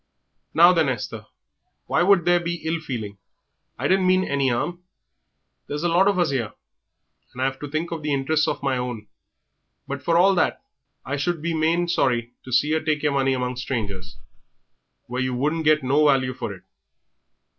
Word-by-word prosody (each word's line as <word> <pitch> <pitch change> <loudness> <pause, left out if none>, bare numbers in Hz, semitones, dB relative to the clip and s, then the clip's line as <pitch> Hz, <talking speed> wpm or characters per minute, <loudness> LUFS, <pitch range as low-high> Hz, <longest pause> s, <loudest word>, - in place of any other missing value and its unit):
"Now, 175 +2 +7
then, 160 -5 +2
Esther, 120 -5 -5 0.6
why 175 - +1
should 185 -2 +4
there 175 0 +4
be 170 0 -3
ill 165 +1 0
feeling. 110 -9 -6 0.6
I 130 - -1
didn't 190 +1 +3
mean 185 0 +4
any 140 -5 0
'arm. 175 +9 -2 0.9
There's 150 +2 -4
a 175 - +2
lot 180 +4 +4
of 200 -2 +2
us 175 -5 +2
'ere, 120 -6 -2 0.8
and 125 - -6
I've 135 0 -1
to 145 - -6
think 155 +4 -3
of 165 -2 -4
the 150 -1 -2
interests 145 +3 +1
of - - -3
my 135 -2 +1
own. 125 -4 -4 0.8
But 140 0 -5
for 165 0 +2
all 190 +3 +5
that 180 +7 0 0.4
I 145 - -2
should 170 +4 -1
be 165 +2 -2
main 165 +2 +1
sorry 120 -7 0
to 130 - -9
see 130 +4 +3
yer 160 +1 +2
take 155 -2 -1
yer 150 - +2
money 135 -1 +1
among 125 -1 -2
strangers, 100 -8 -4 0.9
where 125 0 -3
you 130 -1 -1
wouldn't 155 +5 -1
get 155 -1 +4
no 140 +4 +3
value 130 -2 +2
for - - -5
it. - - -11
145 Hz, 190 wpm, -23 LUFS, 130-170 Hz, 0.9 s, Now